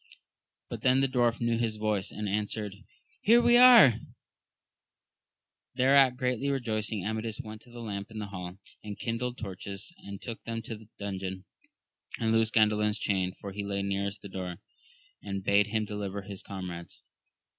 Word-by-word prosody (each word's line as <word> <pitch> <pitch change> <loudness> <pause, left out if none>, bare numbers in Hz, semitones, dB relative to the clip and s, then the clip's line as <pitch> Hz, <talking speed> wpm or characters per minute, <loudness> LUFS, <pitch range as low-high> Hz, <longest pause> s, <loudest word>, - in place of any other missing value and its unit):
but - - -6
then 130 0 +4
the 135 - +3
dwarf 120 -3 +1
knew 115 -1 +1
his 115 -2 0
voice, 105 -2 -1
and 105 0 -4
answered, 105 0 -2 0.5
Here 230 +3 +6
we 240 0 +5
are! 240 - +9 1.8
Thereat 135 0 +5
greatly 125 +2 0
rejoicing, 110 -6 -2
Amadis 110 0 -3
went 110 0 -8
to 120 - -17
the 120 0 -9
lamp 100 -2 -5
in 110 - -9
the 105 - -3
hall, 90 -1 -7 0.3
and 105 -1 -6
kindled 120 +2 -3
torches 100 - -7
and 100 - -8
took 115 -2 -7
them 115 0 -4
to 115 - -6
the 110 0 -15
dungeon, 95 -2 -5 0.7
and 115 -1 +1
loosed 115 0 +2
Gandalin's 105 -1 +3
chain, 95 -4 0
for 100 - -6
he 100 +1 -4
lay 100 0 -2
nearest 100 +1 -2
the - - -6
door, 90 -2 -5 0.7
and 100 -1 -4
bade 100 +1 +4
him 110 0 0
deliver 100 -1 -4
his 100 -1 -7
comrades. 90 -3 -8
105 Hz, 165 wpm, -29 LUFS, 100-115 Hz, 1.8 s, are